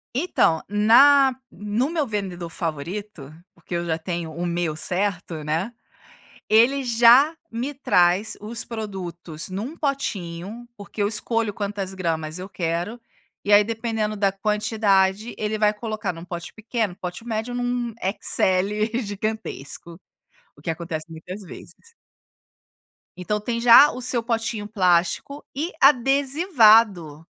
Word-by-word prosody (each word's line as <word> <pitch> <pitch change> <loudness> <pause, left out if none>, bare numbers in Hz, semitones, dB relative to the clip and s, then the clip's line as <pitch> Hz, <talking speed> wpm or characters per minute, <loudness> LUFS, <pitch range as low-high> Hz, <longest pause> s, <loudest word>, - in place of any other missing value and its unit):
Então, 250 - +2
na 260 +6 +5 0.2
no 210 +7 -2
meu 325 -3 -1
vendedor 190 -6 -4
favorito, 165 0 -6 0.2
porque 170 +1 -11
eu 170 0 -1
já 160 -1 -1
tenho 170 0 -5
o 170 +3 -4
meu 170 -2 -1
certo, 180 -2 -3
né, 165 +10 -2 0.8
ele 240 +6 +4
já 240 +6 +5 0.2
me 250 +6 -3
traz 190 -5 +2
os 225 +3 -4
produtos 180 -7 -7
num 220 - -5
potinho. 220 - -4
Porque 205 +1 -6
eu 200 - +2
escolho 225 0 -1
quantas 200 -1 -4
gramas 165 -3 -3
eu 185 +1 -7
quero 175 +4 -3 0.5
e 205 - 0
aí 205 0 +8
dependendo 225 -1 -3
da 200 -1 +1
quantidade, 210 0 +1
ele 215 0 -2
vai 210 -1 +3
colocar 215 -2 -4
num 165 +1 -10
pote 175 -1 -7
pequeno, 220 -4 -3
pote 180 +6 -7
médio, 225 +1 -3
num 245 -1 -2 0.3
XL 210 +5 +2
gigantesco. 205 - -6 0.6
O - - -17
que - - -4
acontece 160 -1 -5
muitas 180 +5 -8
vezes. 460 - -14 1.2
Então 210 +4 -2
tem 235 +2 -3
já 245 +5 +8
o 255 - -7
seu 245 -1 +1
potinho 225 -2 -2
plástico 185 +7 0
e 320 +6 -2
adesivado. 240 - +4
210 Hz, 130 wpm, -23 LUFS, 175-235 Hz, 1.2 s, aí